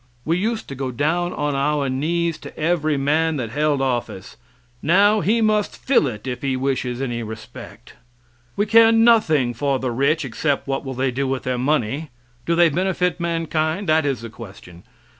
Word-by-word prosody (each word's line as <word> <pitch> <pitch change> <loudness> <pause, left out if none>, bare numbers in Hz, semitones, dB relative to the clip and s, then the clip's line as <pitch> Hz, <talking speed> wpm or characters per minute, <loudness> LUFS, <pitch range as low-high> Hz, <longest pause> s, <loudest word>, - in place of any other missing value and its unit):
We 165 - +1
used 220 +5 -2
to - - -5
go 135 0 -4
down 155 +8 0
on 145 -4 -2
our 140 +1 0
knees 165 +5 -1
to - - -11
every 155 -2 +1
man 155 +4 +1
that 115 -4 -4
held 145 0 +1
office; 120 -7 -3 0.5
now 200 +7 +4
he 225 +4 +2
must 215 -1 +1
fill 255 - +2
it 110 -3 -6
if 125 -2 -4
he 135 -2 -1
wishes 130 -1 -2
any 120 -3 -3
respect. 110 -1 -10 0.6
We 205 - +1
care 225 +1 +6
nothing 215 - +4
for 140 +2 0
the 130 -1 -3
rich, 140 +6 +1
except 140 +4 -2
what 135 0 -2
will 135 -2 -6
they 130 +1 0
do 135 +2 -2
with 130 0 -2
their 125 -1 -2
money? 145 +2 -1 0.4
Do 170 - +2
they 170 0 +5
benefit 180 +2 -1
mankind? 165 +1 -1
That 155 +1 +4
is 135 -4 -2
the 115 -1 -8
question. 95 -6 -12
145 Hz, 180 wpm, -21 LUFS, 130-170 Hz, 0.6 s, care